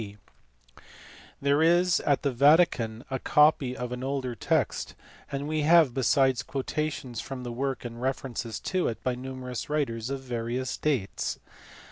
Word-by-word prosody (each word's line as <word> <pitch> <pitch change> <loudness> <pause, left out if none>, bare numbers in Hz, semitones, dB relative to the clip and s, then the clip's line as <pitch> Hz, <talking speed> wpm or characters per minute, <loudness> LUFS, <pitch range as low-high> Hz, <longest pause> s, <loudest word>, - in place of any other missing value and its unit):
D.). 105 -1 -9 1.2
There 140 +2 +2
is 175 +2 +4
at 140 -2 +1
the 140 - +1
Vatican 130 -4 +3
a 130 - -1
copy 150 -4 +3
of 125 0 -4
an 125 +1 -5
older 135 -2 -2
text, - - -1 0.4
and 140 +1 -3
we 155 0 0
have 160 -3 +5
besides 130 0 +3
quotations 135 -2 -3
from 130 -2 -7
the 120 - -5
work 135 +1 -3
and 120 0 -7
references 125 -4 -3
to 185 -1 0
it 115 - -4
by 130 - 0
numerous 125 0 -6
writers 125 -6 -1
of 135 -1 -3
various 125 0 -3
dates. 130 -11 -1
130 Hz, 150 wpm, -27 LUFS, 120-145 Hz, 1.2 s, have